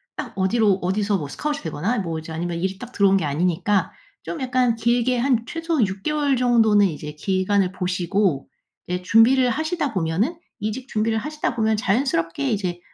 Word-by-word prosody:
딱 255 -7 -5
어디로 200 +1 +2
어디서 200 +2 +1
뭐 150 - -5
스카웃이 295 - -4
되거나 170 +10 -2
뭐 165 -5 -3
이제 160 +1 -9
아니면 170 +1 -3
일이 190 +1 -2
딱 250 +4 -9
들어온 195 -3 +3
게 165 - -1
아니니까 175 +5 0 0.3
좀 335 - -6
약간 250 -2 +1
길게 240 +2 +1
한 240 -2 +1
최소 330 -6 0
6 190 +1 -7
개월 290 -3 +1
정도는 225 -5 +4
이제 150 -3 -4
기간을 190 +3 0
보시고 180 -3 -1 0.4
이제 180 0 -3
준비를 240 +6 +4
하시다 315 +1 -1
보면은 190 - -1 0.2
이직 220 +5 -4
준비를 220 0 0
하시다 300 0 -3
보면 220 -1 +1
자연스럽게 180 - 0
이제 180 -4 -2
210 Hz, 375 characters per minute, -22 LUFS, 180-250 Hz, 0.4 s, 정도는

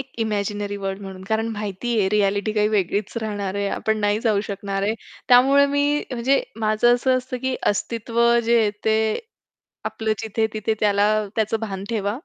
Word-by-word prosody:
एक 270 0 -8
imaginary 205 -1 -2
world 195 0 -4
म्हणून, 190 -1 -8
कारण 220 +1 0
माहितीये 210 0 -1
रिॲलिटी 205 0 +1
काही 210 -1 +2
वेगळीच 205 0 -1
राहणार 205 -3 -3
आहे, 200 0 -1
आपण 220 +1 -1
नाही 205 +1 +1
जाऊ 220 -4 +2
शकणार 195 -1 -3
आहे. 210 +2 +1 0.3
त्यामुळे 270 +3 +6
मी, 285 +1 +1
अ, - - -7
म्हणजे 255 +3 +2 0.2
माझं 215 +3 +4
असं 255 +1 +2
असतं, 255 0 -5
की 260 0 0 0.2
अस्तित्व 230 +2 -3 0.2
जे 235 +1 +4
आहे 215 -2 +2
ते 220 0 +3 0.9
आपलं 220 -1 -1
जिथ-तिथे 220 0 -1
त्याला, 205 -1 +3 0.3
त्याचं 220 0 0
भान 195 -3 -5
ठेवा. 210 0 -1
215 Hz, 165 wpm, -22 LUFS, 200-235 Hz, 0.9 s, त्यामुळे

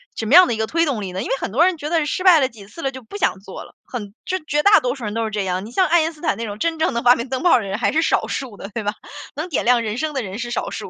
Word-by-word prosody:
什 225 - -4
么 225 - 0
样 365 +1 +9
的 - - -1
一 - - -3
个 220 0 -1
推 335 +5 +1
动 265 -8 -2
力 190 -2 -5
呢？ 185 +1 -4
因 - - -5
为 - - +1
很 - - -4
多 295 - +4
人 370 -2 +1
觉 300 0 -5
得 325 -2 +1
失 365 +5 -2
败 360 -4 +7
了 265 - +2
几 215 -5 -14
次 275 +11 -11
了， 270 - -1
就 260 -1 -9
不 240 - -9
想 205 - 0
做 195 0 -9
了， - - -16
很 210 -5 -7
就 375 - -1
绝 300 -1 0
大 410 +1 +7
多 250 +1 -2
数 265 - -10
人 210 -1 -3
都 230 +1 -1
是 220 - -2
这 210 -2 -2
样。 185 +1 -2
你 225 - -10
像 370 +8 +2
爱 340 +1 +4
因 320 +1 -1
斯 300 - -18
坦 - - 0
那 230 - -4
种 205 -1 -6
真 330 +2 -1
正 320 - +1
的 235 - -1
发 245 +1 +6
明 235 +1 -5
灯 260 +3 -3
泡 355 - +5
的 - - -1
人 195 0 -3
还 225 - +1
是 320 - +2
少 - - +1
数 245 -7 -5
的， 195 - -8
对 230 - -3
吧， 205 0 -1 0.4
能 310 +5 -4
点 300 - -1
亮 245 0 +4
人 215 0 -3
生 310 +2 -2
的 270 - -1
人 195 +1 -7
是 240 0 -4
少 - - -2
数。 - - -7
250 Hz, 400 characters per minute, -20 LUFS, 215-315 Hz, 0.4 s, 样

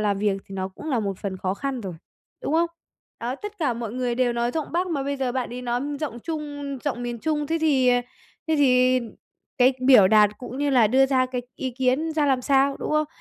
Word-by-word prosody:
làm 205 -2 +1
việc 200 -1 +1
thì 195 - -9
nó 190 0 -3
cũng 195 +11 -9
là 250 -4 +1
một 195 -3 -3
phần 195 -2 -4
khó 185 0 -2
khăn 270 +3 -3
rồi, 190 -5 -6 0.5
đúng - - -2
không? 335 +1 +3 0.5
Đó, 240 +2 -2
tất 415 +5 -8
cả 285 -8 0
mọi 230 -2 -5
người 250 -1 -1
đều 245 0 +1
nói 235 0 0
giọng 315 +2 -4
Bắc 355 +2 +1
mà 295 -5 -1
bây 280 +1 -2
giờ 260 -2 -1
bạn 255 -2 -2
ấy 250 +1 -6
nói 245 0 -1 0.2
giọng 280 -6 -4
Trung 290 -2 -5
giọng 260 -4 -2
miền 240 -1 -4
Trung, 300 +3 -1
thế 330 +3 0
thì, 275 -5 +3
ờ, 245 0 +4 0.5
thế 320 - +2
thì 255 -2 +4 0.6
cái 255 +1 +6
biểu 230 -8 +8
đạt 210 0 +6
cũng 250 +1 -7
như 290 0 +1
là 245 -5 +5
đưa 265 +5 +4
ra 260 -1 +2
cái 250 -1 -4
ý 260 - -3
kiến 260 +5 0
ra 305 -2 +1
làm 265 -2 +2
sao, 275 +1 +3
đúng - - -4
không? 305 0 +2
255 Hz, 245 wpm, -24 LUFS, 235-285 Hz, 0.6 s, biểu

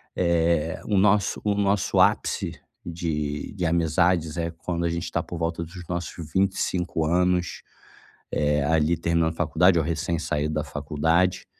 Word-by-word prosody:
eh, 85 -2 +1
o 105 - +1
nosso 100 0 +2
o 105 -1 +1
nosso 100 -1 +1
ápice - - +2 0.3
de 75 -3 -3
de 90 -4 -3
amizades 85 0 +1
é 85 0 -1
quando 85 +1 -3
a 85 - +1
gente 85 +1 -3
tá - - 0
por 85 - -7
volta 85 0 -2
dos 90 +2 -10
nossos 85 -1 -3 0.2
25 95 -4 0
anos, 90 +1 +1 0.7
eh, 75 -1 +1
ali 80 +1 +2
terminando 85 -1 +1
a - - -18
faculdade 90 +2 +3
ou 80 - +1
recém 85 +1 -1
saído 75 -1 -1
da 75 - 0
faculdade. 80 +5 0
85 Hz, 155 wpm, -25 LUFS, 80-90 Hz, 0.7 s, faculdade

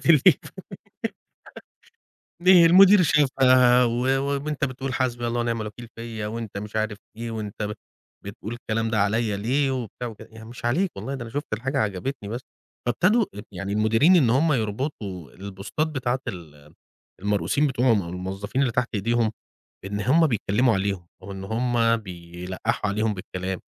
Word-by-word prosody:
في - - -4 0.2
Hل - - +10 2.1
في 180 -2 +8
المدير 190 +3 +8
شافها، 130 -5 +5
و 120 0 0 0.2
وأنت 140 +1 -1
بتقول 130 0 -4
حسبي 120 -2 -1
الله 120 +1 -1
ونعم 115 -1 -1
الوكيل 110 +3 -7
فيّا، 115 -2 -5
وأنت 110 -2 -5
مش 105 +1 -6
عارف 110 -1 -1 0.2
إيه، 115 0 -5
وأنت 105 -1 -5
ب 105 - -2 0.5
بتقول 100 +2 -7
الكلام 115 -1 -2
ده 110 - +1
عليّا 105 +1 +1
ليه؟ 135 +7 +1
وبتاع 125 -1 -4
وكده، 110 - -11
يعني 110 0 -11
مش 120 - -11
عليك 170 +11 +1
والله، 135 - -4
ده 130 - -5
أنا 115 - -8
شُفت 145 0 -5
الحاجة 135 +6 -2
عجبتني، 105 +2 -2
بس 115 +4 -4 0.5
فابتدوا 200 - +3
ال 105 - -7
يعني 100 +1 -4
المديرين، 115 - +4
إن 130 -9 +4
هُم 150 +6 +3
يربطوا 105 - -3
البوستات 100 +10 -4
بتاعة 130 -4 -1
ال 75 -7 -10 0.5
المرؤوسين 105 +9 +1
بتوعهم، 125 -5 +2
أو 85 - -7
الموظّفين 95 +7 -4
اللي 125 - +1
تحت 125 +1 0
ايديهم، 115 +2 +1 0.5
إن 100 +1 -3
هُم 150 +10 +4
بيتكلموا 115 -1 +2
عليهم، 95 -3 -2 0.2
وإن 95 0 -7
هُم 115 +1 +1
بيلقحوا 90 0 -4
عليهم 105 +1 0
بالكلام، 95 -1 -5
115 Hz, 155 wpm, -24 LUFS, 100-130 Hz, 2.1 s, Hل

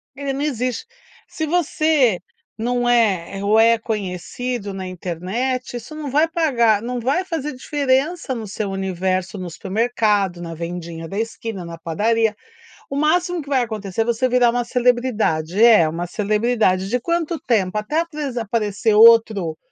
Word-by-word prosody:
Ele 275 0 -3
não 275 - -3
existe. 255 - -2 0.4
Se 315 - -4
você 310 - +2 0.4
não 245 +2 0
é 200 -5 +1
ou 210 +2 +4
é 230 +1 +5
conhecido 210 +1 -4
na 190 -1 -5
internet, 190 +9 -3
isso 240 +6 -10
não 305 -2 -5
vai 300 +5 +3
pagar 245 -11 +2
não 245 +2 -3
vai 270 +10 0
fazer 315 -5 -4
diferença 275 +3 0
no 225 -3 -5
seu 200 0 -4
universo, 190 0 -2
no 185 -2 -5
supermercado, 205 -1 0
na 165 -1 -6
vendinha 170 0 -6
da 195 +4 -4
esquina, 225 -3 -4
na 170 -1 -8
padaria. 215 +6 0 0.5
O 275 - -4
máximo 345 +4 +1
que 285 - -11
vai 265 -2 +2
acontecer, 215 -3 -3
é - - +1
você 240 +2 +1
virar 245 -1 +4
uma 245 +1 0
celebridade. 235 -8 0
É 220 -8 +7
uma 170 +2 -4
celebridade, 210 -1 +1
de 250 +3 0
quanto 335 +3 -1
tempo? 210 -5 0
Até 215 +10 -1
apres 300 -6 -4
aparecer 220 -1 0
outro 220 -7 +5
230 Hz, 155 wpm, -20 LUFS, 195-260 Hz, 0.5 s, É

